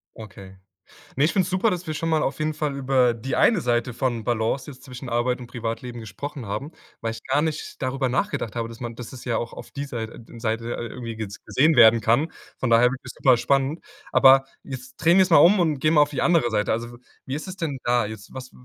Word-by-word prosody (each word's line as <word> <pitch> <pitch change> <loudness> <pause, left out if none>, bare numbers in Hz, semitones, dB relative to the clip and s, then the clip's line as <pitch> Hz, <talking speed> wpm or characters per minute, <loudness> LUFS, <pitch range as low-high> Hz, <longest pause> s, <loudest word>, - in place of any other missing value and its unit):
Okay. 95 -3 -11 0.6
Ne, 140 - +3
ich 155 - +2
find's 185 -4 +1
super, 185 +4 +2
dass 180 -2 -4
wir 155 - -3
schon 165 +2 -2
mal 155 -1 +2
auf 135 - -2
jeden 155 0 0
Fall 150 -2 -2
über 130 -3 +2
die 125 +3 -4
eine 220 -6 +4
Seite 120 -2 0
von 120 -3 -2
Balance 120 +4 -1
jetzt 130 - -14
zwischen 130 -1 -9
Arbeit 120 +1 0
und 125 - -8
Privatleben 120 0 -5
gesprochen 120 +6 -7
haben, 135 +9 -5 0.3
weil 115 0 -2
ich 115 0 -10
gar 135 +2 +1
nicht 155 -1 -4
darüber 130 0 -1
nachgedacht 125 - -2
habe, 115 -1 -2
dass 115 0 -11
man 120 -1 -5
dass 120 -1 -8
es 130 - -10
ja 120 -2 -1
auch 120 - -5
auf - - -10
dieser 140 -4 -5
Sei - - -13 0.2
Seite 115 0 -2
irgendwie 120 0 -5
jetzt 105 -2 -7
gesehen 155 +3 +3
werden 115 -1 +7
kann. 120 +9 +1 0.3
Von 130 - -1
daher 115 +1 +5
finde 125 +2 -1
ich's 125 - -8
immer 130 -2 +7
spannend. 135 +5 0 0.3
Aber 135 0 +7 0.2
jetzt 130 -1 -9
drehen 170 +4 +4
wir's 190 -1 +4
mal 165 - +7
und 170 -2 +5
gehen 155 +4 +2
mal 150 - +6
auf 145 - +1
die 140 - -3
andere 165 -9 +3
Seite. 105 -1 0
Also 120 +1 -4 0.3
wie 130 - -4
ist 155 - -6
es 185 - -7
denn 155 -7 -3
da? 120 -1 +2
Jetzt 105 -1 -9
was 130 -1 -8
130 Hz, 235 wpm, -24 LUFS, 115-150 Hz, 0.6 s, werden